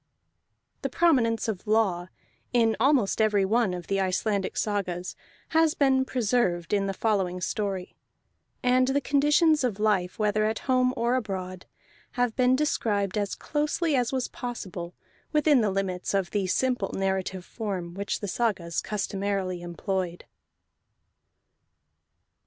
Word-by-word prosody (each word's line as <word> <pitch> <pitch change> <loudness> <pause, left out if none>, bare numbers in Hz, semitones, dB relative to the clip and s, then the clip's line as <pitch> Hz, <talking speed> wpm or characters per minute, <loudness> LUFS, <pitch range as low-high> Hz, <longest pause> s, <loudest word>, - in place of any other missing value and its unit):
The - - -2
prominence 245 -11 +2
of 215 -1 -4
law 200 -5 +2 0.5
in 225 -2 +3
almost 245 -5 +3
every 210 -3 +3
one 220 0 +2
of 180 -1 -5
the 195 +3 0
Icelandic 195 +1 -1
sagas 185 -4 -2 0.3
has 320 -1 +3
been 265 -2 +3
preserved 220 -9 0
in 200 -1 +2
the 195 - -1
following 190 -4 0
story; 190 0 -3 0.7
and 255 +1 +4
the 270 +2 +2
conditions 295 +2 +3
of 220 -5 -1
life, 200 -4 +1
whether 215 0 +1
at 220 0 0
home 255 -1 +3
or 235 +1 +1
abroad, 185 -6 -3 0.5
have 245 -2 0
been 255 0 +4
described 210 -9 0
as 205 -2 -1
closely 300 +1 -1
as 245 -2 +1
was 260 -2 -1
possible 185 -8 -6 0.4
within 300 -3 +4
the 215 - +2
limits 190 -1 -2
of 190 -3 0
the 200 -3 0
simple 245 0 0
narrative 190 -1 -2
form 190 -6 -4
which 200 +2 -3
the 205 - -3
sagas 190 -6 -1
customarily 195 -3 -2
employed. 175 0 -3
210 Hz, 135 wpm, -27 LUFS, 190-250 Hz, 0.7 s, and